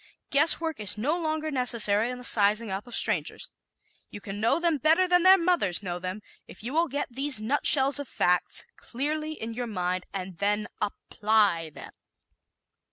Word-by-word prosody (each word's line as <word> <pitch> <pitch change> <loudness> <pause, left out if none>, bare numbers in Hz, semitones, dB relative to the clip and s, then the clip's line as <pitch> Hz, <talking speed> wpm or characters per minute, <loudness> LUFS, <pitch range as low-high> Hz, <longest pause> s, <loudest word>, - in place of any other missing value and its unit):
Guesswork 320 +1 +2
is 210 0 -2
no 280 +10 0
longer 315 -2 -3
necessary 235 -4 +2
in 250 - -5
the 250 - -11
sizing 210 -1 +2
up 195 +5 -5
of 245 - -5
strangers. - - 0 0.6
You - - -9
can 200 0 -8
know 225 +9 +1
them 335 -4 0
better 325 +7 +3
than 355 0 +4
their 375 +2 +7
mothers 335 - 0
know 175 -2 -4
them 185 +3 -5 0.3
if - - -13
you 245 +4 -5
will 335 +2 +2
get 285 +1 -4
these 270 -1 0
nutshells 270 +3 +3
of 285 - -6
facts 180 -4 +1
clearly 305 +5 -4
in 230 -6 -6
your 240 +1 -4
mind 185 -3 -3
and 185 -2 -7
then 210 +1 0
apply 205 -4 0
them. - - -11
235 Hz, 170 wpm, -26 LUFS, 205-305 Hz, 0.6 s, their